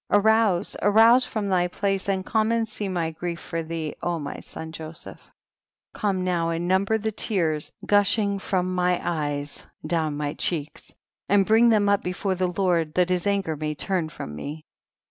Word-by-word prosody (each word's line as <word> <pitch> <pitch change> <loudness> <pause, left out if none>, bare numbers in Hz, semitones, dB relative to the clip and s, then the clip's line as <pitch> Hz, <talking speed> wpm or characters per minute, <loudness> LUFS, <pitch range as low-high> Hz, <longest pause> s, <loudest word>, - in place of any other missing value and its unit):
arouse, 210 -2 +3
arouse 225 +5 +6
from 215 -2 -3
thy 180 -2 +2
place, 195 +1 -1
and 190 -1 -1
come 220 0 +1
and 230 -1 +1
see 205 -2 -4
my 170 -3 -1
grief 170 +1 -5
for 165 -1 -4
thee, 160 -1 -4
O 175 -1 -1
my 145 -3 -6
son 160 0 -8
Joseph. 160 0 -9 0.8
26. - - -13
Come 195 -4 +1
now 175 -2 0
and 165 +1 -2
number 195 +4 +2
the 220 0 -2
tears 165 -8 -1
gushing 205 0 +2
from 185 -1 -1
my 180 -1 +1
eyes 145 -3 -3 0.2
down 155 -2 -1
my 145 0 -2
cheeks, 155 -4 -3 0.4
and 200 -1 +4
bring 225 +3 +5
them 210 -3 +3
up 200 0 +3
before 180 +2 -2
the 185 0 0
Lord, 175 -4 0
that 180 0 +2
his 180 +2 0
anger 195 -6 0
may 150 0 -3
turn 175 0 -1
from 105 - -7
me. 150 - -7
180 Hz, 180 wpm, -25 LUFS, 160-200 Hz, 0.8 s, arouse